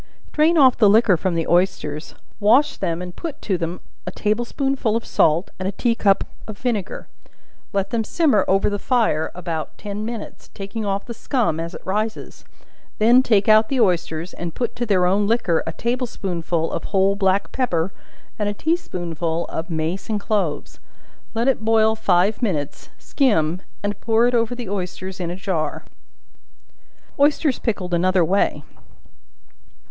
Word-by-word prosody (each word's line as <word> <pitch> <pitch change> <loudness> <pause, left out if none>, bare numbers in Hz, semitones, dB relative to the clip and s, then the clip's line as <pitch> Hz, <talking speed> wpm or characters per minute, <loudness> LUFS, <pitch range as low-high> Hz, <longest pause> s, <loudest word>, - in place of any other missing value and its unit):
Drain 315 +2 +3
off 260 -5 +5
the 210 -3 +6
liquor 215 -2 +5
from 175 +1 -1
the 165 -1 -1
oysters, 170 -4 0 0.2
wash 260 +7 +4
them 170 +1 -2
and 180 0 -8
put 325 -4 -6
to 195 - 0
them 170 0 -3 0.3
a - - -2
table 215 +3 0
spoonful 270 -4 -1
of 230 - -2
salt, 160 +4 +2
and 185 - -2
a - - -1
tea 235 +4 +1
cup 200 -4 +2 0.2
of 215 -2 -7
vinegar; 220 -6 -3 0.6
let 200 0 -1
them 230 -1 0
simmer 270 - +2
over 195 +1 +3
the 205 0 -1
fire 220 - +1
about 170 -3 -5
ten 205 0 -5
minutes, 230 -1 -7
taking 200 +3 -5
off 195 0 -2
the 235 - -6
scum 225 - -1
as 165 +2 -5
it - - -11
rises; 215 +3 -3 0.5
then 235 +4 +6
take 210 -6 +2
out 215 0 +5
the 270 - 0
oysters, 175 -4 0
and 170 -2 -6
put 240 -1 -2
to 240 0 -3
their 185 -4 +3
own 200 +3 +2
liquor 220 -7 +1
a - - -1
table 245 +2 -2
spoonful 170 -5 -2
of - - -4
whole 195 0 +2
black 195 0 +1
pepper, 185 -8 -1 0.5
and 205 -1 0
a 205 - -4
tea 320 +9 +1
spoonful 170 - -3
of 165 +4 -4
mace 165 +6 -3
and 215 -1 0
cloves; 200 -7 -2 0.6
let 230 +3 0
it 265 -5 +1
boil 220 0 +3
five 195 +1 +2
minutes, 155 - -2
skim, 180 - +1 0.2
and 205 0 -3
pour 225 +1 +3
it 245 - 0
over 230 0 +1
the 240 -3 -6
oysters 185 0 -5
in 175 -2 -3
a 175 - -4
jar. 180 -6 -3 1.4
Oysters 290 -1 +3
Pickled 185 -6 -2
another 180 0 +3
way. 195 +5 +1
200 Hz, 170 wpm, -21 LUFS, 180-230 Hz, 1.4 s, the